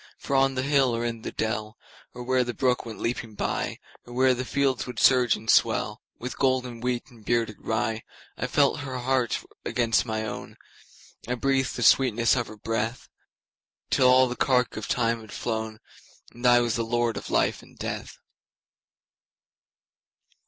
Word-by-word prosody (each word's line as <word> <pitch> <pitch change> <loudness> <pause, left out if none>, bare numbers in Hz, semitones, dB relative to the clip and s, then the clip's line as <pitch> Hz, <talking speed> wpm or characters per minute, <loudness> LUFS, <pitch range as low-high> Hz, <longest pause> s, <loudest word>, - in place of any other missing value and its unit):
For 140 - -3
on 135 0 +3
the 130 - -1
hill 135 -3 +3
or 115 +1 -2
in 115 -1 -3
the - - -5
dell, 110 0 -3 0.4
Or 125 - -6
where 130 0 +2
the 120 -1 -5
brook 125 -2 +1
went 110 - -7
leaping 115 -2 -3
byOr - - -2 0.3
where 130 +2 +2
the 125 +1 -3
fields 135 -1 0
would 125 -2 -7
surge 125 -3 +5
and 110 - -11
swellWith 125 +2 0
golden 125 -3 0
wheat 125 -1 -1
or 120 - -16
bearded 115 -1 -1
rye,I 110 0 -4
felt 145 +1 +2
her 135 -3 -5
heart 125 -1 0 0.2
against 115 0 +1
my 110 0 -2
own,I 120 +2 -9
breathed 135 +1 0
the 120 - -2
sweetness 120 -1 +4
of 120 -2 -1
her 110 - -11
breath, 115 +3 -3 0.8
Till 130 - +4
all 130 0 +6
the 125 - -4
cark 125 -1 +2
of 110 - -5
time 115 -1 0
had 110 - -13
flown, 110 -2 -3 0.5
And 120 +1 -1
I 120 0 +6
was 115 -1 0
lord 115 0 0
of - - -6
life - - +1
and - - -19
death. - - -5
120 Hz, 160 wpm, -26 LUFS, 115-130 Hz, 0.8 s, all